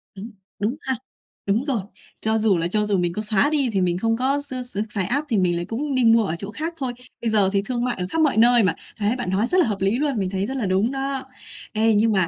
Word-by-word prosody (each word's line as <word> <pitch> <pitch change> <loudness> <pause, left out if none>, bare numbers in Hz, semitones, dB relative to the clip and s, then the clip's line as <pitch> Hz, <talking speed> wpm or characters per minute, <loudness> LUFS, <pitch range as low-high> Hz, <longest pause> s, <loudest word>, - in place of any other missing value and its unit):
Đúng, 215 +4 -8 0.3
đúng 215 +6 0
ha. 265 -1 -1 0.5
Đúng 215 +7 +1
rồi. 250 -8 0 0.4
Cho 220 0 +1
dù 215 -4 +3
là 165 +1 0
cho 210 +3 0
dù 205 -2 +1
mình 175 -1 0
có 210 - -3
xóa 215 +5 +2
đi 290 -4 +1
thì 190 - +2
mình 175 -1 +1
không 225 +4 +1
có 270 +3 +1
x 285 -2 -9
x 245 - -10
xài 200 -3 -2
app 285 +10 -1
thì 220 - +1
mình 180 -2 +2
lại 175 0 -2
cũng 275 +4 -3
đi 255 - +2
mua 225 -1 +5
ở 170 - -2
chỗ 200 +1 -5
khác 325 +6 -4
thôi. 260 -5 -3 0.3
Bây 230 - 0
giờ 205 -3 +4
thì 200 - +3
thương 240 -1 -2
mại 250 - -1
ở 180 - -2
khắp 325 - 0
mọi 285 -7 +2
nơi 240 0 +6
mà. 180 -4 +2 0.2
Thấy 215 +3 0
bạn 245 -8 -3
nói 200 +5 +1
rất 365 - +1
là - - +3
hợp 200 -3 -2
lý 195 +4 +2
luôn, 285 -5 0
mình 190 -2 -1
thấy 195 +1 -1
rất 265 +3 -4
là 225 - -1
đúng 190 +6 +1
đó. 270 0 -2 0.5
Ê, 220 +1 +3
nhưng 220 +2 +3
mà 190 -4 +3
220 Hz, 290 wpm, -23 LUFS, 195-260 Hz, 0.5 s, nơi